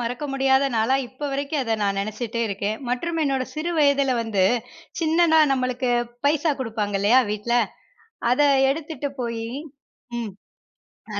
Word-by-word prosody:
மறக்க 245 +4 -3
முடியாத 270 0 +3
நாளா 225 +5 +3
இப்ப 280 +4 -6
வரைக்கும் 280 +2 -1
அத 225 -2 0
நான் 200 -1 0
நெனச்சிட்டே 215 +3 -3
இருக்கேன். 200 +2 -2
மற்றும், 330 +7 -1
என்னோட 270 -3 0
சிறு 315 +3 -2
வயதுல 280 -2 +3
வந்து 210 -5 +1 0.6
சின்னதா 320 0 +4
நம்பளுக்கு 255 -1 -1 0.4
பைசா 305 +1 +2
குடுப்பாங்க 215 -5 -2
இல்லயா, 230 +6 +5
வீட்டுல 225 +3 0 0.8
அத 255 - +3 0.3
எடுத்துட்டு 300 -1 -4
போய். 230 -1 -3 0.7
ம். 220 -4 -4 0.8
அ. - - -1
255 Hz, 135 wpm, -23 LUFS, 225-285 Hz, 0.8 s, இல்லயா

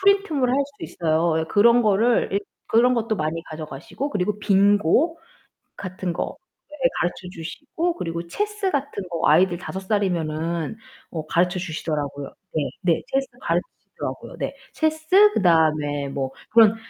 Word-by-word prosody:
프린트물 385 -9 +3
할 260 - +2
수 280 0 -16
있어요. 160 0 +1
예 - - -1
그런 235 +7 +5
거를 220 +3 +3
일 200 - +1 0.3
그런 245 +3 +4
것도 225 -2 0
많이 155 +1 -2
가져가시고 155 - -6
그리고 205 +1 -1
빙고 205 - +3 0.6
같은 185 -2 -4
거 - - -3 0.4
네 260 -1 +4
가르쳐 175 +1 -2
주시고 295 - -3
그리고 170 - -4
체스 415 - -1
같은 265 - -3
거 165 -1 0
아이들 175 +3 +4
5 185 +2 -5
살이면은 170 -4 -1 0.3
어 160 -2 -5
가르쳐주시더라고요. 160 -6 -1 0.2
네. 145 -3 0
네. 175 -3 +2
체스 270 0 +1
가르쳐주시더라고요. - - -4
네. - - -3 0.2
체스 315 +7 +4
그다음에 155 -5 +2
뭐 135 -1 -3 0.2
그런 225 -1 +7
190 Hz, 315 characters per minute, -23 LUFS, 160-250 Hz, 0.6 s, 그런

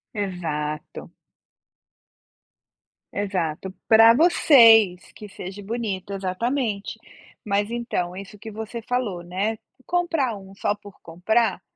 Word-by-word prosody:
Exato. 160 -7 -4 2.0
Exato, 190 -3 -3 0.2
para 225 +1 +8
vocês, 230 - +5
que 210 - -11
seja 195 +1 -8
bonito, 200 -3 -4
exatamente, 205 +3 -2 0.5
mas 205 +1 0
então 230 -7 -3
isso 200 +1 -10
que 220 +1 -9
você 220 +2 -6
falou, 220 -7 -2
né, 190 +6 -2 0.3
comprar 330 -9 0
um 195 -1 -12
só 205 - 0
por 205 -1 -15
comprar, 220 +8 0
205 Hz, 100 wpm, -23 LUFS, 185-230 Hz, 2.0 s, para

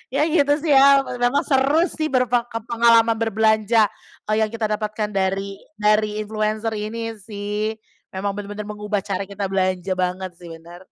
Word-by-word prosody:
Ya, 290 - +3
gitu 290 -3 +3
sih 320 - +1
ya, 275 0 +6 0.2
memang 245 +4 +2
seru 280 +4 +3
sih 310 -1 -2
berpe 250 -3 +2 0.3
pengalaman 230 -1 +4
berbelanja, 220 -1 +2 0.3
kalau 215 0 -1
yang 220 - +2
kita 225 0 -3
dapatkan 215 0 -3
dari 195 0 -2 0.2
dari 210 0 +1
influencer 215 +1 -2
ini 220 +1 -5
sih, 210 +1 -4 0.4
memang 200 +1 -1
benar-benar 205 +1 -6
mengubah 210 -1 -3
cara 195 -1 -3
kita 200 -1 -4
belanja 185 -1 0
banget 185 0 -2
sih, 175 - -11
benar. 165 +1 -11
215 Hz, 155 wpm, -21 LUFS, 200-230 Hz, 0.4 s, ya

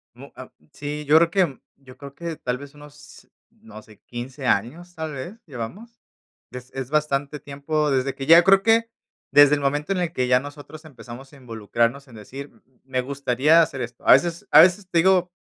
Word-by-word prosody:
Mu 135 +3 -14
ah, 130 0 -10 0.2
sí, 150 0 -6
yo 150 +2 +5
creo 165 +1 +4
que 175 -7 0 0.2
yo 130 -2 -17
creo 140 -1 -12
que 170 -2 -6
tal 125 0 -3
vez 140 +2 -12
unos, 145 +5 -16 0.2
no 225 - -15
sé, 105 -1 -20
15 130 +3 -7
años, 160 - -2
tal 160 -1 -5
vez, 140 +11 -8
llevamos. 180 - -9 0.5
Es 125 0 -10
es 135 -2 -6
bastante 150 -1 -1
tiempo 145 +2 -3
desde 135 0 0
que 135 - -7
ya 165 +4 +7
creo 195 +1 +5
que 230 +2 +2 0.4
desde 145 0 +7
el 145 - -5
momento 145 +6 -1
en 185 - -3
el 175 -2 -2
que 125 -6 -2
ya 125 0 +3
nosotros 145 +2 -11
empezamos 130 -2 -12
a 145 - -16
involucrarnos 115 +2 -3
en 120 - -15
decir: 135 +7 -10
"M - - -28
m 130 -2 -37
me 130 -1 -3
gustaría 140 +4 +2
hacer 150 -4 -2
esto". 120 0 -8
A - - +5
veces 170 -1 +3
a 150 - +8
veces 185 +3 +4
te 170 - -1
digo, 180 +1 +3
145 Hz, 205 wpm, -22 LUFS, 130-165 Hz, 0.5 s, a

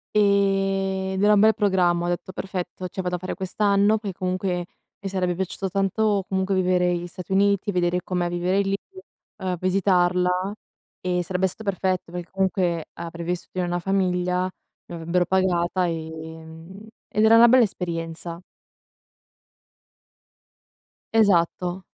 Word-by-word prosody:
E 195 -1 +2
ed 190 +1 -1
era 210 0 +6
un 205 - +5
bel 220 +2 +6
programma, 180 -5 +2
ho - - -1
detto: 175 +1 -3
"Perfetto, 185 -1 -5
cioè 185 +2 -5
vado 180 -1 -2
a - - -2
fare 185 - -4
quest'anno". 200 +2 +2
Perché 200 -4 -6
comunque 185 -1 -2 0.4
mi 195 - -4
sarebbe 180 -2 -1
piaciuto 190 +1 -3
tanto 195 +1 +1
comunque 190 0 0
vivere 180 -1 +2
gli 175 0 -4
Stati 180 +1 -9
Uniti, 200 +1 +2
vedere 180 -1 +1
com'è 180 -1 -1
vivere 175 +2 0
lì, 195 0 0 0.6
uhm, 185 -1 -2
visitarla 180 0 +2 0.5
e 180 -1 0
sarebbe 180 +2 0
stato 190 +4 -8
perfetto 185 -2 -1
perché 175 0 -6
comunque 185 -4 0
avrei 170 0 -7
vissuto 180 +1 -4
in 180 - +1
una 175 0 -1
famiglia, 180 -1 0 0.4
mi 175 - -7
avrebbero 170 +2 0
pagata, 180 -1 +1
ehm, 160 +4 -8 0.2
ed 215 - 0
era 220 +1 +7
una 235 +1 +8
bella 250 +1 +6
esperienza. 170 -3 -4 2.7
Esatto, 185 -3 +2
185 Hz, 140 wpm, -24 LUFS, 175-195 Hz, 2.7 s, una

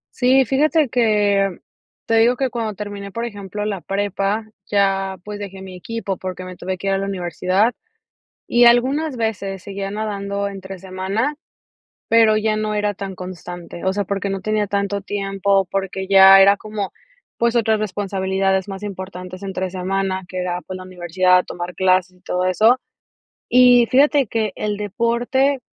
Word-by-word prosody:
Sí, 260 +1 +4
fíjate 300 +2 +2
que 205 -5 +2 0.5
te 225 - +1
digo 235 +2 +4
que 265 -1 -1
cuando 225 -3 -3
terminé, 200 -1 -7
por 230 +3 -3
ejemplo, 205 -2 -6
la 200 -4 -3
prepa, 200 +2 -1 0.2
ya, 195 -1 +1
pues, 210 0 -7
dejé 195 -1 -7
mi 190 -1 -9
equipo 200 0 -4
porque 185 0 -6
me 185 0 -8
tuve 185 +1 -4
que 195 - -5
ir 195 - +2
a - - +1
la 195 - -2
universidad 190 +4 0 0.7
y 240 0 +5
algunas 265 +5 +3
veces 200 -4 -3
seguía 195 0 -5
nadando 200 -1 -3
entre 195 -1 -8
semana, 195 +9 -2 0.7
pero, 225 -1 +5
ya 215 0 +1
no 215 0 -2
era 210 0 0
tan 195 -1 -6
constante. 175 -1 -8
O 190 - +2
sea, 205 0 -1
porque 200 +1 -2
no 195 -1 -3
tenía 215 0 0
tanto 200 0 -1
tiempo, 195 -1 0
porque, 195 0 -3
ya 195 0 +9
era 200 +1 +6
como, 210 -2 -5 0.5
pues, 235 0 +1
otras 220 -1 +2
responsabilidades 190 -1 -1
más 195 +1 -7
importantes 185 -1 -7
entre 190 -1 -3
semana, 190 0 -2
que 185 - -6
era, 180 0 -2
pues, 185 - -6
la 185 - -8
universidad, 180 0 +2
tomar 175 0 -6
clases 185 -1 +2
y - - -31
todo 180 0 -2
eso. 220 +7 +4 0.7
Y 245 -1 +6
fíjate 280 +1 +4
que 215 -2 -1
el 210 -1 -2
deporte 235 +6 0
200 Hz, 165 wpm, -20 LUFS, 190-220 Hz, 0.7 s, ya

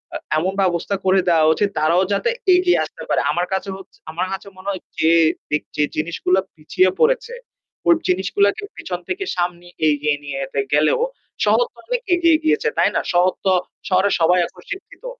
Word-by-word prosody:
আ - - 0 0.2
এমন 185 +4 0
ব্যবস্থা 185 +1 0
করে 190 0 +4
দেওয়া 160 -2 +4
উচিত 205 +3 0
তারাও 170 +4 +3
যাতে 335 - 0 0.3
এগিয়ে 360 0 +3
আসতে - - -11
পারে। - - +2
আমার 175 +1 -1
কাছে 190 +1 -2
হছ 195 - -13 0.2
আমার 175 +3 -2
কাছে 195 - -6
মনে 190 +2 -6
হয় 185 - -5 0.2
যে 160 +1 +4 0.4
যে - - +3 0.2
যে 150 - +2
জিনিসগুলা 170 +4 0 0.2
পিছিয়ে 165 +4 +1
পড়েছে 475 0 +2 0.5
ওই 340 - +7
জিনিসগুলাকে 200 - +1
পেছন 180 -1 -5
থেকে 390 +2 -2
সামনে 175 0 -2 0.2
এগিয়ে 150 0 +1
নিয়ে 140 -1 -5
যেতে 135 +1 -4
গেলেও 150 +1 +3 0.5
শহর - - +4
তো - - -35
অনেক - - -1
এগিয়ে 335 -2 +4
গিয়েছে। 315 - +2
তাই - - +4
না? - - +2
শহর 180 +1 +4
তো 190 - +4 0.4
শহরের 190 +1 +3
সবাই 180 +2 +4
এখন 180 - -17
শিক্ষিত 405 +5 -9
185 Hz, 180 wpm, -20 LUFS, 170-200 Hz, 0.5 s, ওই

